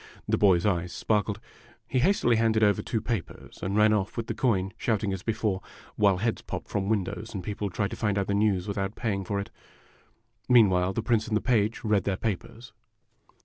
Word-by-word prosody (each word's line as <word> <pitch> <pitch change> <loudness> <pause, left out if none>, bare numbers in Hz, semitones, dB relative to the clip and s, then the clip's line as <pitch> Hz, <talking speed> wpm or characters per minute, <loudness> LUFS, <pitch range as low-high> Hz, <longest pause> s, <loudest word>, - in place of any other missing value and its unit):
The - - +2
boy's 95 -3 +4
eyes 90 -3 0
sparkled. 105 -2 0 0.5
He 130 - 0
hastily 125 - +3
handed 110 -1 +2
over 105 -2 +3
two 110 - -2
papers, 115 -6 -5
and 100 +2 -1
ran 110 0 +5
off 105 +1 -1
with 115 - -2
the 115 - -3
coin, 105 -5 0
shouting 105 -3 -1
as 95 - -4
before, 105 -3 -1 0.3
while 100 -3 +3
heads 110 +4 -1
popped - - -6
from 100 -1 -1
windows 110 +1 -2
and 95 - -4
people 105 +1 -3
tried 100 +3 -2
to - - -4
find 105 -2 0
out 100 - +1
the 100 - -1
news 100 -2 +1
without 100 0 -3
paying 100 -4 -2
for 100 +2 -2
it. 100 - -6 1.0
Meanwhile 95 -6 +5
the 110 - -2
Prince 110 -1 +1
and 110 -1 +1
the - - 0
Page 115 -2 +1
read 105 -4 +1
their 95 -2 0
papers. 115 +2 -5
105 Hz, 200 wpm, -27 LUFS, 95-110 Hz, 1.0 s, ran